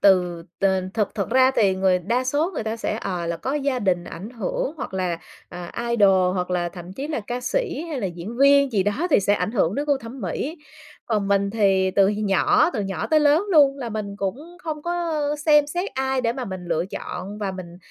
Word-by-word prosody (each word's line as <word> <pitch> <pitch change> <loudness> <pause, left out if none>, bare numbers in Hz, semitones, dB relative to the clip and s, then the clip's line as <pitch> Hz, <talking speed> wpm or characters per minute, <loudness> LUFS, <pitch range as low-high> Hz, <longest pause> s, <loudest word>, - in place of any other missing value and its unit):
từ 180 -3 +3 0.2
t - - 0 0.3
thực 210 -3 -1
thực 200 0 -2
ra 260 +1 +5
thì 210 -8 +2
người 190 -1 +2
đa 235 +8 -1
số 295 +7 +1
người - - -2
ta 220 +1 -3
sẽ, 220 -1 -2
ờ, 180 -3 -3
là 170 0 -2
có 265 +9 -3
gia 280 -3 0
đình 185 -5 0
ảnh 195 +7 -8
hưởng 240 +3 -3
hoặc 250 -8 -6
là, 180 -3 -1 0.3
à, 175 -1 -8 0.2
idol, 190 -5 +4
hoặc 180 0 -2
là 175 -1 0
thậm 175 0 -10
chí 275 +8 -5
là 300 - -2
ca 245 +1 -3
sĩ 330 - -1
hay 295 -5 -3
là 200 - -1
diễn 175 +6 -7
viên 280 -1 +5
gì 200 -3 +2
đó 205 - 0
thì - - +5
sẽ 200 +1 +2
ảnh 210 - -1
hưởng 200 -4 +1
đến 285 - -1
gu 285 - +3
thẩm 240 +2 -9
mỹ. 315 +5 -3 0.5
Còn 210 -3 0
mình 200 0 +2
thì 195 -3 +2
từ 195 0 +4
nhỏ 215 - +3
từ 220 - -2
nhỏ 195 -1 -3
tới 310 -1 +3
lớn 300 +6 +4
luôn 280 -3 +5
là 245 -3 -4
mình 210 -2 -5
cũng 275 - -5
không 310 -2 -4
có 345 -2 -1 0.2
xem 295 -1 +4
xét 350 +6 -3
ai 265 0 0
để 230 -1 0
mà 255 +1 -4
mình 185 -4 -6
lựa 170 -1 0
chọn 195 +1 -6
và 200 -2 -2
mình 175 -2 -9
215 Hz, 230 wpm, -23 LUFS, 190-280 Hz, 0.5 s, ra